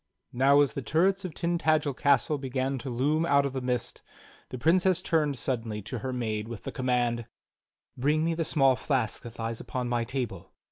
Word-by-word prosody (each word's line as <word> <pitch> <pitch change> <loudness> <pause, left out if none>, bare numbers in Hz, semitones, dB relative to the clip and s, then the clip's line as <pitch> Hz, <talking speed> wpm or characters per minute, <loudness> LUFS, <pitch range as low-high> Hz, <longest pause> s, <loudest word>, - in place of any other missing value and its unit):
Now, 140 +3 +5
as 145 - +1
the 140 - -3
turrets 190 +8 +1
of 170 - -6
Tintagel 155 -4 +1
castle 140 +2 +2
began 135 0 -2
to 135 - -6
loom 145 +6 +1
out 140 -4 +3
of 140 - -3
the 130 - -3
mist, 125 -2 -2 0.5
the 130 - -6
Princess 180 +6 +3
turned 155 -6 0
suddenly 115 -5 -3
to 115 +4 -5
her 130 +4 -4
maid 110 -4 -2
with 115 -3 -8
the - - -5
command: 120 -2 0 0.7
"Bring 150 +5 +1
me 165 - +1
the 165 0 -1
small 135 -5 +3
flask 125 -3 -1
that 120 -1 -10
lies 115 0 -3
upon 125 -1 -4
my 120 -1 +1
table." 115 -8 -5
135 Hz, 190 wpm, -28 LUFS, 120-155 Hz, 0.7 s, Now